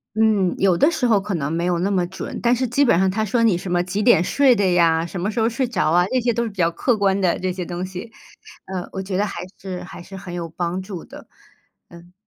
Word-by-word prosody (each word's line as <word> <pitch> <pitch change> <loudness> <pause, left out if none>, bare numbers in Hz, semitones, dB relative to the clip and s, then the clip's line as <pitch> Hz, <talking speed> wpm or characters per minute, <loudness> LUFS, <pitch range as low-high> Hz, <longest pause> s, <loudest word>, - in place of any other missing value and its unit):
嗯， 215 -4 +2
有 190 -3 +3
的 295 - +4
时 255 -6 0
候 215 -4 +3
可 200 -1 -3
能 145 -4 -2
没 170 +1 -1
有 175 -1 0
那 185 +3 0
么 185 -3 +1
准， 190 - -7
但 240 0 +4
是 255 +1 0
基 245 +5 +2
本 235 -10 +4
上 190 0 +3
它 215 +4 -1
说 220 +3 0
你 215 -6 +3
什 180 +1 -6
么 175 0 +2
几 195 +4 -2
点 225 -8 +5
睡 265 +8 +4
的 200 -4 +1
呀， 165 -2 +3
什 175 +1 -6
么 205 +4 -1
时 230 - -3
候 225 - +3
睡 235 +3 -1
着 240 -9 0
啊， 175 +1 +4
这 255 - +2
些 240 -1 +1
都 235 +1 0
是 230 - -3
比 200 - -16
较 170 -3 +2
客 230 +7 0
观 200 -1 +2
的 180 -2 +1
这 185 0 -2
些 180 -1 -5
东 175 +1 -4
西， 190 +5 -8 0.5
呃， 185 -2 -5
我 190 - -4
觉 190 0 -4
得 200 +3 +1
还 - - -6 0.2
是， 185 -2 -6
还 180 - -10
是 195 +2 -10
很 185 -2 -8
有 170 -1 -4
帮 175 +3 -3
助 190 -3 -8
的， - - -13 0.7
嗯。 170 +1 -15
190 Hz, 300 characters per minute, -21 LUFS, 175-220 Hz, 0.7 s, 点